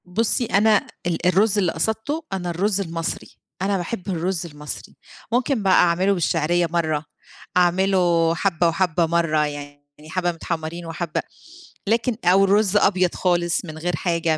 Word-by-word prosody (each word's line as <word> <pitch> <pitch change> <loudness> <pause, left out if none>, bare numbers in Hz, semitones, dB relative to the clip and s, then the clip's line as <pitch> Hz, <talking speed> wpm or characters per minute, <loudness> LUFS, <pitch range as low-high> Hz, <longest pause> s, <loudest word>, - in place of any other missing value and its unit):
بُصّي 225 +6 0
أنا 215 0 +3 0.2
ال 175 0 -1
الرز 200 +4 +3
اللي 185 -4 +2
قصَدته، 220 - -2
أنا 180 -2 -3
الرز 195 +4 0
المصري، 165 -2 -5 0.2
أنا 195 +1 +1
باحب 185 +2 -5
الرز 180 0 -2
المصري. 150 -2 -9 0.4
ممكن 245 -1 +1
بقى 190 -1 +4
أعمله 180 +3 +4
بالشعريّة 175 -1 +1
مرّة، 155 -3 0 0.5
أعمله 175 -2 +3
حبّة 170 -1 +1
وحبّة 170 0 +1
مرّة 160 -2 +1
يعني، 145 -1 -8
يعني 155 +1 -14
حبّة 175 +1 0
متحمّرين 165 0 -5
وحبّة 165 0 -3 0.7
لكن 230 +2 +1
أو 185 +3 +5
رُز 205 0 +3
أبيض 185 -3 +2
خالص 175 -1 0
من 155 -2 -8
غير 175 +2 -2
حاجة، 165 -1 0
175 Hz, 145 wpm, -22 LUFS, 165-195 Hz, 0.7 s, أو